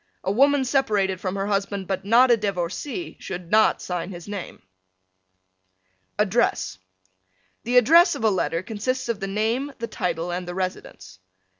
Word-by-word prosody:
A 190 - 0
woman 275 +4 +3
separated 205 -8 +1
from 185 0 -3
her 195 0 -2
husband 200 -1 -2
but 190 0 -3
not 240 +5 +5
a - - +7
divorcee 205 - -4
should 175 -2 -7
not 215 0 +4
sign 180 -1 -4
his 175 -1 -9
name. 205 -3 -7 1.5
ADDRESS 210 - 0 0.9
The 245 +2 +2
address 335 - +6
of - - -6
a 220 - +4
letter 175 -2 -1
consists 245 +5 -3
of 230 -4 -1
the 195 - -3
name, 225 +8 -1
the 230 - -4
title 175 -5 -3
and 180 0 -4
the 175 - -5
residence. 95 - -6
200 Hz, 155 wpm, -24 LUFS, 185-240 Hz, 1.5 s, a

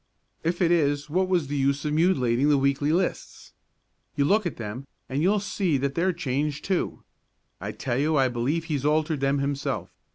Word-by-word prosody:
"If 175 +3 0
it 170 - +3
is, 145 -3 +1
what 185 +3 +2
was 180 -4 +1
the 145 +2 -4
use 140 +1 0
of 150 - 0
mutilating 145 -6 +2
the 145 - +5
weekly 140 +2 +1
lists? 180 +3 -2 0.6
You 140 -1 +2
look 205 +4 +3
at - - -6
them 115 +4 -6 0.2
and 135 +3 -2
you'll 200 +5 +3
see 195 -5 0
that 135 +1 -1
they're 175 +5 +1
changed 145 -3 -2
too. 190 -2 -1 0.6
I 100 +3 -4
tell 120 +4 -2
you 155 +2 +2
I 135 -1 +4
believe 130 +7 -1
he's 150 -5 -2
altered 155 0 +1
them 135 +1 +1
himself. 140 0 -2
145 Hz, 190 wpm, -26 LUFS, 135-170 Hz, 0.6 s, the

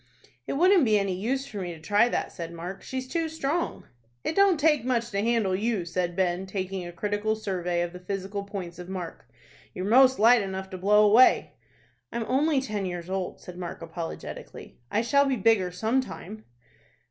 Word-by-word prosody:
"It - - -2
wouldn't 360 +4 +5
be 215 -4 +4
any 195 -2 0
use 250 +9 -2
for 215 -7 -7
me 175 -2 -5
to - - -13
try 205 +8 +3
that," - - -2
said 170 -2 -7
Mark. 175 +3 -7
"She's 260 0 -5
too 330 +3 -1
strong." 320 +2 -2 0.4
"It 320 - -2
don't 395 -5 +4
take 300 -4 +3
much 235 -2 -1
to 200 0 0
handle 220 -4 +1
you," 210 -2 -1
said 175 0 -2
Ben, 185 0 0
taking 190 -1 -4
a - - -7
critical 205 +4 -1
survey 180 -5 -2
of 175 0 -5
the 180 - -8
physical 195 +2 -4
points 185 -4 -7
of 180 0 -8
Mark. 180 -9 -7 0.5
"You're 185 - -3
most 260 +4 +6
light 230 +2 +6
enough 190 -1 -5
to 185 - -5
blow 210 +3 +5
away." 225 +5 +5 0.6
"I'm 235 -1 -3
only 285 +3 +2
ten 210 -7 -3
years 175 0 -6
old," 190 -1 -3
said 180 0 -10
Mark, 175 -1 -6
apologetically. 165 0 -8
"I 220 - +1
shall 280 +4 +3
be 270 - +1
bigger 205 -4 +3
some 220 +8 +1
time." 215 -3 -9
205 Hz, 195 wpm, -27 LUFS, 180-245 Hz, 0.6 s, most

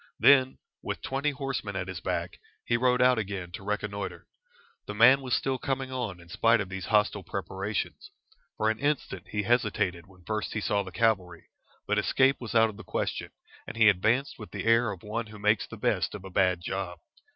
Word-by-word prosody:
Then, 130 -2 +5 0.2
with - - -5
twenty 135 +2 0
horsemen 135 -7 -4
at 95 -1 -3
his 95 -2 -5
back, - - -3 0.3
he 120 - +1
rode 125 +1 +3
out 125 -2 +4
again 95 -4 -4
to 90 - -7
reconnoitre. 100 -1 -4 0.6
The - - -5
man 130 +5 +7
was 130 -2 0
still 135 -1 -1
coming 135 0 -2
on 120 -8 -3
in 85 - -15
spite 115 +7 +3
of 100 -3 -3
these 95 -2 -5
hostile 105 -1 +2
preparations. 105 - -4 0.5
For 110 0 +2
an 110 - -5
instant 140 - -2
he 105 -1 -2
hesitated 100 -6 0
when 90 -2 -19
first 110 +1 -2
he 110 - -1
saw 105 -1 +1
the 95 -2 -8
cavalry, 90 -4 0 0.4
but - - +1
escape 135 +1 +3
was 120 -1 -6
out 115 -1 +5
of 100 - -15
the - - -9
question, - - -3 0.4
and - - -7
he 110 -1 +7
advanced 110 +8 +1
with 105 - -8
the - - -5
air 115 0 +4
of 95 -3 -9
one 110 +2 -3
who 105 0 -11
makes 105 +1 +2
the - - -9
best - - 0
of 95 - -9
a 95 - -9
bad 90 -1 +2
job. 90 -1 -4
105 Hz, 205 wpm, -28 LUFS, 95-125 Hz, 0.6 s, man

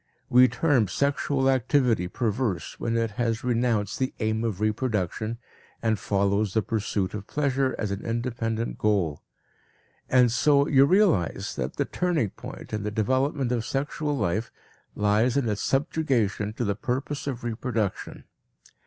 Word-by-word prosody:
We 125 +1 +7
term 125 -3 +2
sexual 140 +3 0
activity 130 - +2
perverse 110 -3 -2
when 115 0 -1
it 115 -1 0
has 115 -1 0
renounced 115 -4 0
the 130 0 -1
aim 110 0 0
of 110 -5 -2
reproduction 110 0 -1 0.4
and 110 -3 0
follows 100 0 0
the 110 - +3
pursuit 100 -3 -2
of 105 -1 -6
pleasure 135 -2 0
as 105 -3 -2
an 100 +1 -4
independent 115 -1 -2
goal. 95 -9 +1 0.9
And 125 -2 +5
so 140 +3 +3
you 135 -1 +6
realize 180 - +2
that - - -3
the - - 0
turning 165 - 0
point - - -10
in 105 - -1
the 105 - -2
development 130 +5 0
of 120 -2 0
sexual 145 +3 -2
life 110 +1 -1 0.4
lies 105 +5 +2
in 135 -4 +1
its 105 -1 -1
subjugation 125 -8 0
to 120 - -2
the 100 - +1
purpose 135 +7 -3
of 125 -4 -4
reproduction. 115 -3 -3
115 Hz, 145 wpm, -26 LUFS, 105-130 Hz, 0.9 s, We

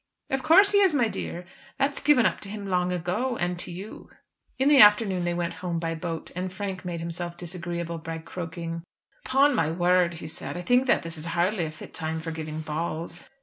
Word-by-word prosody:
"Of 270 0 0
course 390 +8 +6
he 405 - +5
is, 380 -6 +4
my 245 -5 +3
dear; 175 -4 -5 0.3
that's 275 +1 +1
given 275 -6 +4
up - - +1
to 200 - -8
him 205 0 -6
long 180 -2 0
ago, 185 +9 -1
and 175 0 -2
to - - -3
you." 190 +5 -9 0.5
In 265 +1 +2
the 290 -2 +6
afternoon 210 -4 +6
they 175 - 0
went 170 0 -2
home 175 -2 -2
by 165 0 -2
boat, 165 0 -5
and 185 +1 -3
Frank 190 -1 -5
made 175 -2 -4
himself 170 +1 -5
disagreeable 170 -1 -3
by 165 0 -5
croaking. 165 0 -6 0.5
"Upon 275 +2 +4
my 165 -10 +1
word," 175 +1 +2
he 160 - -8
said, 155 +2 -4
"I - - -4
think 250 +5 +3
that 240 - +3
this 165 -1 -3
is 155 - -2
hardly 180 0 +1
a - - -4
fit 155 - -11
time 160 -1 -3
for 165 +1 -5
giving 155 -1 -5
balls." 165 +2 -4
175 Hz, 215 wpm, -26 LUFS, 165-210 Hz, 0.5 s, course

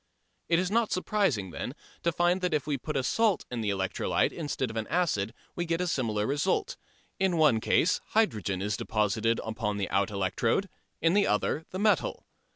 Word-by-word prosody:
It 170 - +4
is 180 +2 0
not 230 0 +2
surprising, 185 - 0
then, 125 - -5 0.3
to 170 - +1
find 175 +2 +2
that 180 -3 +1
if 145 - -1
we 150 -1 0
put 150 +3 -4
a 135 - 0
salt 215 - +2
in 120 -2 -2
the 105 - -1
electrolyte 95 -2 0
instead 145 -6 -3
of - - -10
an 110 -1 -2
acid 145 - 0 0.2
we 175 - -1
get 165 0 -1
a 180 - 0
similar 115 -10 0
result. 165 - 0 0.4
In 190 0 +3
the - - 0
one 150 -8 +5
case 165 +9 +2
hydrogen 105 - +1
is 105 -1 0
deposited 110 +2 0
upon 110 -2 -2
the 100 - -1
out 100 0 +2
electrode, 105 - 0 0.3
in 165 +1 +3
the 205 0 +4
other 145 +9 0
the 185 - -5
metal. 205 -4 +1
145 Hz, 195 wpm, -29 LUFS, -, 0.4 s, one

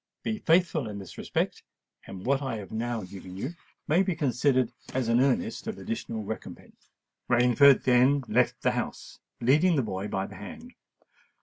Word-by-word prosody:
Be 220 -1 -2
faithful 165 - +2
in 105 - -6
this 95 -3 -9
respect—and 95 -1 -5
what 135 +2 +2
I 135 -4 -2
have 100 -3 -9
now 115 0 -2
given 95 0 -10
you 130 - -4 0.3
may 165 +5 +4
be 190 -3 0
considered 130 -2 +1 0.2
as 130 -3 0
an 115 +1 +4
earnest 225 - 0
of 220 -1 -4
additional 210 - -4
recompense." 110 +2 -9 0.4
Rainford 125 +3 +5
then 130 +3 +4
left - - +1
the - - +3
house, - - -5 0.2
leading 155 +9 +4
the 135 - +2
boy 100 -2 -4
by 95 -1 -2
the 95 - -10
hand. 235 - -10
125 Hz, 165 wpm, -28 LUFS, 110-150 Hz, 0.4 s, Rainford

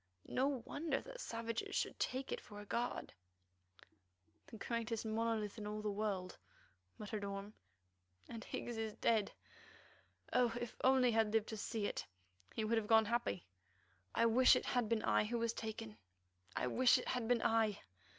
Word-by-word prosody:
"No 265 -2 0
wonder 290 -3 -1
that - - -9
savages 230 0 -3
should - - -1
take 260 +1 -1
it - - -2
for 205 - -10
a 205 - -8
god." 240 +4 -2 1.3
"The 225 - -9
greatest 230 0 -2
monolith 220 -1 -1
in 210 - -4
all 210 0 -4
the 210 - 0
world," 200 -3 -2 0.6
muttered 210 0 -4
Orme, 200 +1 -5 0.7
"and 230 -1 -7
Higgs 240 -1 -4
is 220 -1 -2
dead. 220 -2 +2 1.0
Oh! 240 -2 +3
if 240 -1 -5
only 260 -1 +5
he - - -1
had 220 -2 +3
lived 225 -1 +2
to 220 - -3
see 215 0 -2
it, 145 - -3 0.5
he 220 - 0
would 225 +1 +2
have 210 - -6
gone 220 0 +6
happy. 235 -5 -1 0.7
I - - +4
wish 250 +3 +7
it - - 0
had 245 -4 +1
been 230 -2 +1
I - - +3
who 235 +3 -1
was 230 0 0
taken; 160 - -6 0.6
I - - 0
wish 245 - +5
it - - -4
had 245 -3 -1
been 245 -1 +3
I!" 225 -2 +3
225 Hz, 170 wpm, -38 LUFS, 210-240 Hz, 1.3 s, wish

